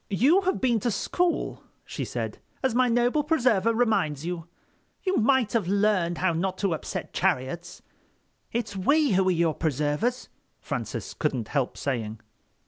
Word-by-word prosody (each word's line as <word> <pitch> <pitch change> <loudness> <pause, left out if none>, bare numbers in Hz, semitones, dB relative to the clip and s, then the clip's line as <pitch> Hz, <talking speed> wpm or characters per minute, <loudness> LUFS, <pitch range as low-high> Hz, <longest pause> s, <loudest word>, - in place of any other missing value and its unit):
"You 275 - +4
have 375 - +1
been 240 -3 +2
to 240 - 0
school," 345 - -1 0.2
she - - -4
said, - - -4 0.2
"as 260 -3 +2
my 255 +1 +3
noble 245 +5 +2
preserver 250 - +2
reminds 200 - +1
you. 170 -2 -4 0.6
You 380 -1 +1
might 255 -1 +3
have 220 -7 +1
learned 195 -4 +2
how 185 -2 +1
not 185 +3 -1
to 195 -3 0
upset 160 - -5
chariots." 165 +8 -1 0.7
"It's 225 -3 -3
we 285 +10 +3
who 190 0 +3
are - - +4
your 170 -2 +2
preservers," 150 - -1 0.3
Francis - - -4
couldn't 130 -8 -2
help 140 -4 -1
saying. 115 -5 -3
200 Hz, 150 wpm, -26 LUFS, 165-245 Hz, 0.7 s, You